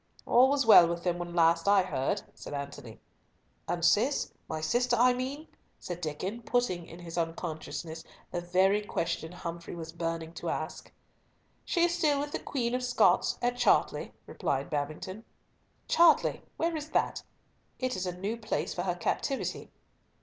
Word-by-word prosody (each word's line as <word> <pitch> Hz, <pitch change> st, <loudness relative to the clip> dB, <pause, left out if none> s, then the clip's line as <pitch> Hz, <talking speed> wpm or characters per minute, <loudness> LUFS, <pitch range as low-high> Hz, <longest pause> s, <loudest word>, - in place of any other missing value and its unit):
"All 255 Hz, +2 st, +6 dB
was 280 Hz, -2 st, +2 dB
well 180 Hz, -6 st, +9 dB
with 170 Hz, 0 st, -3 dB
them 175 Hz, -1 st, 0 dB
when 175 Hz, 0 st, -5 dB
last 165 Hz, +1 st, +3 dB
I 200 Hz, -2 st, +6 dB
heard," 135 Hz, -7 st, -1 dB
said -, -, -8 dB
Antony. 140 Hz, -5 st, -7 dB, 0.7 s
"And 170 Hz, -1 st, 0 dB
Cis—my 210 Hz, -, +1 dB
sister 240 Hz, +10 st, +1 dB
I 250 Hz, +2 st, +5 dB
mean?" 270 Hz, +5 st, -4 dB, 0.3 s
said 175 Hz, -1 st, -6 dB
Diccon, 185 Hz, +9 st, -4 dB
putting, 230 Hz, -9 st, 0 dB
in 165 Hz, -, -11 dB
his 175 Hz, -1 st, -5 dB
unconsciousness, 165 Hz, 0 st, -4 dB, 0.3 s
the 175 Hz, -, -2 dB
very 190 Hz, +4 st, +3 dB
question 170 Hz, -4 st, -2 dB
Humfrey 170 Hz, -1 st, -6 dB
was 165 Hz, -1 st, -7 dB
burning 165 Hz, -1 st, -4 dB
to -, -, -4 dB
ask. -, -, -4 dB, 0.7 s
"She 340 Hz, -, +1 dB
is 345 Hz, 0 st, +3 dB
still 300 Hz, -5 st, +2 dB
with 290 Hz, +1 st, -3 dB
the -, -, -2 dB
Queen 240 Hz, -4 st, -2 dB
of 250 Hz, 0 st, -1 dB
Scots, 250 Hz, 0 st, +3 dB
at 245 Hz, 0 st, +1 dB
Chartley," -, -, +2 dB
replied 135 Hz, 0 st, -2 dB
Babington. 155 Hz, +8 st, -4 dB, 0.6 s
"Chartley, 335 Hz, -2 st, +4 dB, 0.2 s
where 330 Hz, 0 st, 0 dB
is 305 Hz, 0 st, -5 dB
that? -, -, 0 dB, 0.6 s
It 255 Hz, -1 st, -1 dB
is 185 Hz, 0 st, -3 dB
a 180 Hz, 0 st, -4 dB
new 205 Hz, +5 st, -3 dB
place 225 Hz, -, -2 dB
for -, -, -3 dB
her -, -, -1 dB
captivity." 270 Hz, -2 st, -2 dB
180 Hz, 160 wpm, -30 LUFS, 165-245 Hz, 0.7 s, well